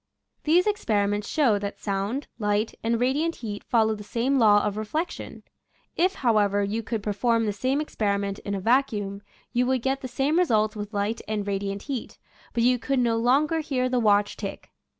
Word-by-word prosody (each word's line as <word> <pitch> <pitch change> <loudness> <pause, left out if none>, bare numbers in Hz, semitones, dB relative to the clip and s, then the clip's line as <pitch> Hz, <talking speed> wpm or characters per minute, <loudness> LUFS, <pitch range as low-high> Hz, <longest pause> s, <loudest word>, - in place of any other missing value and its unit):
These 340 +4 +4
experiments 205 - 0
show 250 -10 +3
that 200 0 -5
sound, 205 +7 -2
light, 210 +1 0
and 230 0 +1
radiant 290 +7 +1
heat 210 -3 -6
follow 220 -2 +2
the 210 -1 -7
same 250 +6 0
law 205 -3 +5
of 205 -1 -1
re 215 - -3
flection. 315 +11 -4 0.5
If, 370 +3 +2
however, 205 -5 +2
you 210 +3 -1
could 225 -1 -4
perform 225 +2 +1
the 210 - -1
same 260 +7 0
experiment 200 -8 -1
in 200 - -4
a - - -2
vacuum, 205 -3 +1 0.3
you 245 +1 +2
would 260 -2 0
get 270 +1 0
the 260 - -4
same 280 +6 +1
results 215 -11 +2
with 205 0 -6
light 205 +2 -1
and 210 -1 -2
radiant 200 0 -3
heat, 270 -5 -5 0.3
but 235 - 0
you 250 0 +3
could 275 +3 -1
no 235 -2 +2
longer 280 +7 +2
hear 260 -5 -1
the 250 -1 +1
watch 205 -2 +3
tick. 195 -2 -7
225 Hz, 190 wpm, -25 LUFS, 205-260 Hz, 0.5 s, law